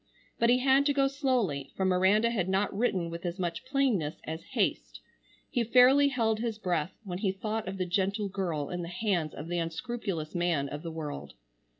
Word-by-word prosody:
But 235 - +4
he 245 - +6
had 270 +2 +4
to 285 - +3
go 275 -1 +4
slowly, 250 - 0
for 190 - 0
Miranda 190 +5 +3
had 190 -6 -1
not 195 +1 0
written 190 -6 0
with 170 0 -6
as 175 0 -3
much 175 0 -3
plainness 255 - +1
as 160 +1 -5 0.2
haste. - - 0 0.5
He 245 -5 +1
fairly 255 +5 +6
held 225 -5 +1
his 225 -2 -2
breath 175 -5 -2
when 180 -3 -5
he 195 -2 +1
thought 215 +2 -3
of 190 +1 -4
the 185 - -1
gentle 195 +3 0
girl 175 -7 -3
in 175 0 -3
the 170 - -5
hands 175 -4 -1
of 150 - -7
the 175 0 -1
unscrupulous 165 -1 -4
man 175 -5 +1
of 145 +1 -6
the 170 - -5
world. 145 - -6
190 Hz, 200 wpm, -29 LUFS, 170-235 Hz, 0.5 s, he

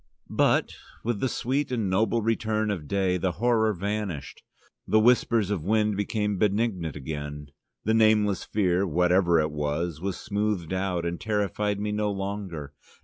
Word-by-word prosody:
But - - +2 0.3
with 115 -2 -1
the 130 - 0
sweet 135 +4 -1
and 115 -5 0
noble 110 +4 +1
return 110 -1 0
of 85 -8 -4
day 95 -1 +1
the 90 0 -1
horror 110 +3 +2
vanished: 100 -5 -4 0.5
the 110 - +4
whisper 115 0 +4
of 100 -5 -2
wind 105 +2 +2
became 105 -1 -1
benignant 100 - 0
again: 75 0 -6 0.3
the 110 - +1
nameless 110 -3 +3
fear, 95 -2 +1
whatever 90 +1 +3
it 75 -1 0
was, 75 +2 -2
was 95 -1 -2
smoothed 105 -5 -2
out 95 -2 -1
and 85 0 -3
terrified 105 -1 -1
me 105 0 -2
no 105 0 0
longer. 95 -7 -5
100 Hz, 150 wpm, -26 LUFS, 85-110 Hz, 0.5 s, the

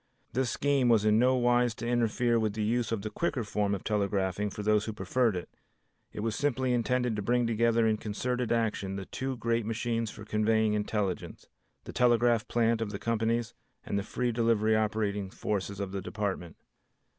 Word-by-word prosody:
This 130 +1 +1
scheme 140 -1 +2
was 110 -3 +4
in 105 0 +4
no 130 +2 +4
wise 120 -1 +2
to 115 - -5
interfere 120 0 +2
with 110 -2 0
the 110 0 -2
use 115 +1 0
of 110 -3 -2
the 110 - -4
quicker 145 -8 -1
form 100 -1 0
of 95 - -7
telegraphing 100 -1 0
for 105 +1 -6
those 105 0 +2
who 110 - -4
preferred 105 +3 +1
it. 90 - -4 0.6
It - - -6
was 110 0 -1
simply 130 -3 0
intended 125 0 +1
to 105 - -2
bring 120 +4 +1
together 115 0 +2
in 110 -1 +2
concerted 125 +4 -2
action 110 -4 0
the 95 -1 -5
two 130 +4 -4
great 115 0 0
machines 115 +1 -2
for 105 - -10
conveying 110 0 +2
intelligence, 105 -3 -2 0.4
the - - -9
telegraph 120 -2 +3
plant 115 -1 +1
of 110 - -1
the 100 - -4
companies 115 +1 -1 0.3
and 100 - -1
the - - -1
free 120 +4 -2
delivery 110 -2 +2
operating 105 -2 0
forces 100 0 -3
of 100 -2 -3
the 100 0 -3
Department. 95 -4 -4
110 Hz, 190 wpm, -29 LUFS, 105-120 Hz, 0.6 s, was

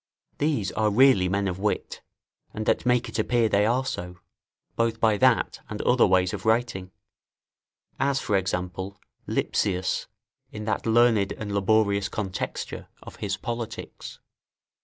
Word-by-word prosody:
These 145 - 0
are 110 -1 +1
really 105 -4 +5
men 100 +1 0
of 90 0 -3
wit, 105 +1 -2 0.5
and 110 - -3
that - - +1
make 125 0 +2
it 115 - -5
appear 115 +1 +2
they 105 0 +2
are 125 +3 +1
so, 90 -6 -5 0.6
both 115 -1 0
by 110 -2 +3
that - - +2
and 105 - -5
other 125 -3 +4
ways 90 -1 +2
of - - -5
writing; 110 -5 0 1.1
as 140 -1 +1
for 105 - -1
example, 95 +1 -2 0.3
Lipsius, 95 -2 -1 0.4
in 105 0 -7
that 110 - -2
learned 115 -3 +3
and 105 -2 -6
laborious 100 0 +2
contexture 95 -5 -4 0.2
of - - -11
his 100 -1 -3
Politics. 115 -1 -6
105 Hz, 140 wpm, -26 LUFS, 95-115 Hz, 1.1 s, really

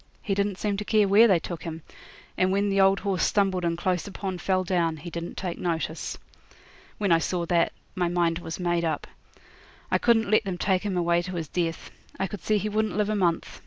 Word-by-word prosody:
He 200 - -1
didn't 200 -1 0
seem 205 -1 -1
to 210 - -3
care 210 -1 +3
where 210 +4 +7
they 190 -5 +5
took 170 0 -6
him; 165 -2 -6 0.5
and 185 0 +2
when 200 +1 +1
the 195 0 +3
old 195 +1 +4
horse 195 -4 -1
stumbled 195 -3 +1
and 170 -1 0
close 180 0 -1
upon 190 -2 -5
fell 185 0 +1
down 170 -3 0
he 170 +3 -8
didn't 170 +1 -6
take 180 -3 -4
notice. 160 -2 -3 0.8
When 200 -3 0
I 165 - +6
saw 175 +1 -1
that, 170 0 +2 0.2
my 180 -2 0
mind 170 -1 +1
was 165 0 -6
made 175 -1 0
up. 155 -3 -1 0.9
I - - +3
couldn't 225 -3 +3
let 215 - +4
them 190 -3 -3
take 185 0 +1
him 200 -3 -2
away 170 0 +2
to 180 +1 -6
his 165 -3 -3
death. 165 -2 -2 0.3
I 195 - +1
could 200 0 -7
see 215 - +1
he 210 - -2
wouldn't 215 0 -1
live 210 0 +1
a - - 0
month. 175 -4 0
185 Hz, 225 wpm, -26 LUFS, 170-200 Hz, 0.9 s, where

